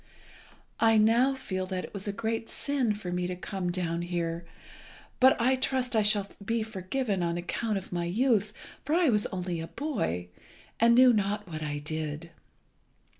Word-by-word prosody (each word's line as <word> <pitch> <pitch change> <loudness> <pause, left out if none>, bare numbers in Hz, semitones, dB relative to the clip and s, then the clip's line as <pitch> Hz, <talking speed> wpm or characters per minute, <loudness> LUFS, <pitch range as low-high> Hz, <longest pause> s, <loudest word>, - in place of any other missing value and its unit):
I 225 -1 +5
now 235 +5 +4
feel 185 -8 -4
that 185 -1 -3
it - - -9
was 200 0 -5
a - - 0
great 225 +2 -3
sin 265 -7 0
for 190 -4 -6
me 180 0 -1
to 180 - -3
come 180 0 -3
down 170 -2 -2
here, 170 -1 -3 0.7
but 260 0 +6
I 255 +3 +3
trust 260 -1 0
I 220 - +5
shall 205 -1 +2 0.2
be 225 +2 0
forgiven 210 0 -2
on 170 0 0
account 205 +5 -2
of 190 - -7
my 175 -1 -1
youth, 210 +2 +2 0.3
for 300 +4 0
I 345 -4 +4
was 210 -3 +2
only 180 -2 -3
a 165 - -5
boy, 90 - -3 0.5
and 235 +1 +5
knew 250 0 +7
not 205 -1 -1
what 155 -2 -6
I 150 -1 -3
did. 155 +2 -4
200 Hz, 175 wpm, -29 LUFS, 175-230 Hz, 0.7 s, knew